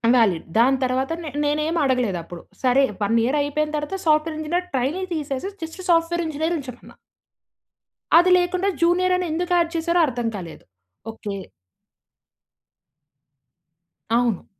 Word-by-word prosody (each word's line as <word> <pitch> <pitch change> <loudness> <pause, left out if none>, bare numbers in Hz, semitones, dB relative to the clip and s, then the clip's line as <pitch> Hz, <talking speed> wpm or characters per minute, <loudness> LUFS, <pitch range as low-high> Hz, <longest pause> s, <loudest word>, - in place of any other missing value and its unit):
Valid. 200 -9 +2
దాని 260 +4 +4
తరువాత 260 +3 0
నే 310 - -5 0.2
నేను 295 +1 +1
ఏమి 330 +1 0
అడగలేదు 250 -8 +1
అప్పుడు. 170 0 -10 0.2
సరే 260 +2 +4 0.2
1 210 +3 +1
ఇయర్ 270 +5 +1
అయిపోయిన 300 +1 -1
తరువాత 295 +6 -4
సాఫ్ట్‌వేర్ 310 0 +2
ఇంజినీర్ 345 +4 -2
ట్రైనీ 275 +9 -1
తీసేసి 295 +2 -3
జస్ట్ 325 +4 -7
సాఫ్ట్‌వేర్ 340 0 +2
ఇంజినీర్ 315 +2 -1
ఉంచమన్నా. 255 -3 -11 1.2
అది 350 +2 +5
లేకుండా 360 +2 0
జూనియర్ 360 +2 +3
అని 365 - -2
ఎందుకు 355 +3 -2
యాడ్ 335 -1 +1
చేసారో 340 +1 +1
అర్థం 240 -3 -2
కాలేదు. 170 -4 -9 0.5
ఓకే. 210 -3 -6 2.8
అవును. 235 -4 +1
300 Hz, 130 wpm, -22 LUFS, 250-340 Hz, 2.8 s, అది